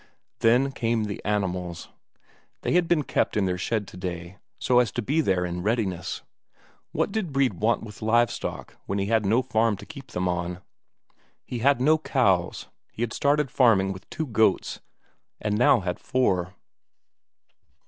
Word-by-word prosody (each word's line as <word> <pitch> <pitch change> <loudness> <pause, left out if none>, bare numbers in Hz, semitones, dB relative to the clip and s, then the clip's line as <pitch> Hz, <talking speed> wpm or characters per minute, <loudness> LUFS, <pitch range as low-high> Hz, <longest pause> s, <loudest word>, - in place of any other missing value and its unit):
Then 125 +4 +3
came 115 -4 0
the 105 -2 -5
animals. 90 -4 -2 0.7
They - - 0
had 175 -1 +3
been 165 -3 +2
kept - - 0
in 100 - +2
their 90 -1 -1
shed 110 0 -1
today, 90 0 -6 0.2
so 125 -2 +3
as 120 -5 +2
to 120 - -1
be 150 +9 +1
there 95 - +1
in 90 0 -4
readiness. 105 -4 -2 0.7
What - - 0
did 195 -6 -2
Brede 135 -10 +1
want 115 +2 +1
with 105 -2 -10
live 115 +2 +3
stock - - -6
when 100 - -1
he 100 - 0
had 110 -1 +1
no 115 +6 +3
farm 110 -2 +1
to - - -11
keep 140 -4 -10
them 90 -5 -2
on? 90 0 -2 0.8
He 125 - -5
had 140 +2 +3
no 155 +5 +4
cows; 95 - +1 0.2
he 115 - -4
had 115 - -3
started 145 -1 +1
farming 100 -7 +4
with 95 +1 -13
two 160 - -3
goats, 110 -6 +1 0.6
and 105 -1 -1
had 105 - 0 0.3
now 90 - 0
four. 95 -6 0
110 Hz, 170 wpm, -26 LUFS, 95-125 Hz, 0.8 s, no